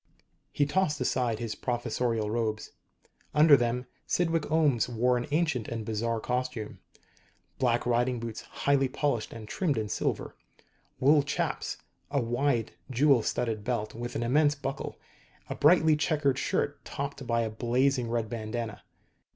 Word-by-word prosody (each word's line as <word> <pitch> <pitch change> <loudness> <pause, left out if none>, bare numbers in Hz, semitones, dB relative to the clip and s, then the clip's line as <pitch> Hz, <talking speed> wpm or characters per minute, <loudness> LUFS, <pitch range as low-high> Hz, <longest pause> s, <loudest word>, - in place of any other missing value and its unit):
He 145 - +2
tossed 150 -1 +1
aside 125 -3 0
his 115 -1 -3
professorial 120 -3 -1
robes. 110 -2 -2 0.6
Under 150 -1 +8
them 120 0 0 0.2
Cydwick 165 -3 +1
Ohms 150 -7 +2
wore 125 +1 +2
an 120 0 -2
ancient 150 -7 0
and 115 -2 -4
bizarre 115 +1 -1
costume: 125 -2 -3 0.8
black 120 -2 +2
riding 120 +1 +1
boots, 115 -1 -5
highly 140 -1 +1
polished 130 -3 -1
and 110 -2 -9
trimmed 150 - 0
in 110 -1 -2
silver; - - -2 0.6
wool 145 +3 +5
chaps; 140 - -2 0.3
a 140 0 +1
wide, 120 0 0 0.2
jewel 135 0 +4
studded 110 -1 -2
belt 110 -2 -2
with 120 +2 -6
an - - -1
immense 145 +4 +3
buckle; 140 -1 -5 0.5
a - - +1
brightly 160 0 +5
checked 150 -2 +1
shirt 145 +2 -1
topped 140 -2 -5
by 115 0 +2
a 115 - -1
blazing 125 +2 +1
red 115 -1 -1
bandana. 110 0 -4
125 Hz, 145 wpm, -29 LUFS, 115-145 Hz, 0.8 s, Under